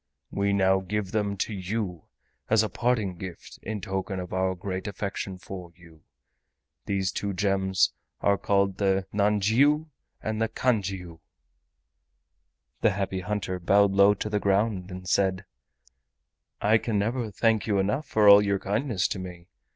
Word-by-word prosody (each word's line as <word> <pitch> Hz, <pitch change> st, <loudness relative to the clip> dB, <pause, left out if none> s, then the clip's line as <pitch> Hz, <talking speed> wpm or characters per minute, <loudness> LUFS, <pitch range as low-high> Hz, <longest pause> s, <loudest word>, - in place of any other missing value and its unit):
We 100 Hz, 0 st, 0 dB
now 95 Hz, -1 st, +3 dB
give 95 Hz, +1 st, -3 dB
them 105 Hz, -2 st, -1 dB
to 105 Hz, -, -2 dB
you 95 Hz, -3 st, -4 dB, 0.4 s
as 110 Hz, 0 st, +4 dB
a 110 Hz, -, -2 dB
parting 110 Hz, -4 st, 0 dB
gift 90 Hz, -1 st, -9 dB
in 105 Hz, -1 st, -5 dB
token 95 Hz, 0 st, -3 dB
of 90 Hz, 0 st, -6 dB
our 95 Hz, 0 st, 0 dB
great 95 Hz, +2 st, -5 dB
affection 100 Hz, -1 st, -4 dB
for 90 Hz, -2 st, -9 dB
you. 85 Hz, -2 st, -18 dB, 0.9 s
These 95 Hz, -2 st, 0 dB
two 100 Hz, +1 st, -3 dB
gems 95 Hz, -1 st, +1 dB, 0.3 s
are 100 Hz, -1 st, +2 dB
called 100 Hz, -1 st, +1 dB
the 95 Hz, -1 st, +1 dB
nanjiu 110 Hz, +10 st, +3 dB, 0.3 s
and 110 Hz, 0 st, -3 dB
the 115 Hz, -, +1 dB
kanjiu." 95 Hz, -8 st, -1 dB, 1.6 s
The -, -, +4 dB
Happy 95 Hz, -1 st, -2 dB
Hunter 95 Hz, -1 st, -3 dB
bowed 100 Hz, +3 st, +4 dB
low 100 Hz, +1 st, +5 dB
to 105 Hz, -, -4 dB
the 105 Hz, -1 st, 0 dB
ground 100 Hz, -1 st, 0 dB
and 90 Hz, 0 st, -8 dB
said: 95 Hz, 0 st, +1 dB, 1.1 s
"I 110 Hz, +2 st, +4 dB
can 110 Hz, -2 st, -1 dB
never 115 Hz, +3 st, -1 dB
thank 110 Hz, +2 st, +1 dB
you 105 Hz, -2 st, +2 dB
enough 105 Hz, +11 st, 0 dB
for 105 Hz, -1 st, +3 dB
all 100 Hz, 0 st, +10 dB
your 100 Hz, -1 st, +1 dB
kindness 105 Hz, 0 st, -1 dB
to 95 Hz, -, -3 dB
me. 90 Hz, -1 st, -9 dB
100 Hz, 150 wpm, -26 LUFS, 95-105 Hz, 1.6 s, all